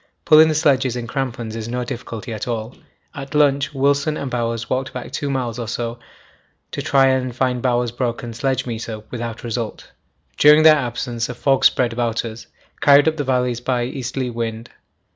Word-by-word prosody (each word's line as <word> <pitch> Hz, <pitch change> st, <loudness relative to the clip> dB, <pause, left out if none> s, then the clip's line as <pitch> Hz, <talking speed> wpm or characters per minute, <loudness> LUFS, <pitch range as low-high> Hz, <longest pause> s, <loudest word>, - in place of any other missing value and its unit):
Pulling 155 Hz, 0 st, +7 dB
the 155 Hz, -, 0 dB
sledges 135 Hz, -5 st, +2 dB
in 120 Hz, -1 st, -4 dB
crampons 120 Hz, -3 st, -4 dB
is 115 Hz, -1 st, -5 dB
no 125 Hz, +1 st, -2 dB
difficulty 115 Hz, -1 st, -6 dB
at 110 Hz, -, -5 dB
all. 115 Hz, 0 st, -4 dB, 0.4 s
At 140 Hz, -1 st, -7 dB
lunch 140 Hz, -2 st, +3 dB
Wilson 140 Hz, +2 st, +1 dB
and 135 Hz, -2 st, -4 dB
Bowers 115 Hz, -1 st, -2 dB
walked 130 Hz, +1 st, -2 dB
back 125 Hz, -, -7 dB
2 145 Hz, -, -3 dB
miles 125 Hz, -3 st, -2 dB
or 115 Hz, -, -4 dB
so 115 Hz, +1 st, -4 dB, 0.7 s
to -, -, -4 dB
try 135 Hz, -1 st, +3 dB
and 130 Hz, -2 st, +1 dB
find 125 Hz, -1 st, 0 dB
Bowers' 120 Hz, -2 st, +1 dB
broken 120 Hz, -1 st, -3 dB
sledgemeter, 115 Hz, -3 st, -3 dB
without 115 Hz, -2 st, -5 dB
result. 115 Hz, -1 st, -5 dB, 0.5 s
During 150 Hz, +1 st, +7 dB
their 155 Hz, -1 st, +9 dB
absence 120 Hz, -3 st, -3 dB
a 125 Hz, -, -5 dB
fog 135 Hz, +1 st, +2 dB
spread 120 Hz, -2 st, +3 dB
about 115 Hz, -1 st, -1 dB
us, 115 Hz, 0 st, -8 dB, 0.3 s
carried 140 Hz, 0 st, +6 dB
up 160 Hz, 0 st, +1 dB
the 145 Hz, -, -1 dB
valleys 125 Hz, -2 st, 0 dB
by 125 Hz, -1 st, 0 dB
easterly 130 Hz, 0 st, -3 dB
wind. 115 Hz, -1 st, -5 dB
125 Hz, 180 wpm, -20 LUFS, 115-135 Hz, 0.7 s, their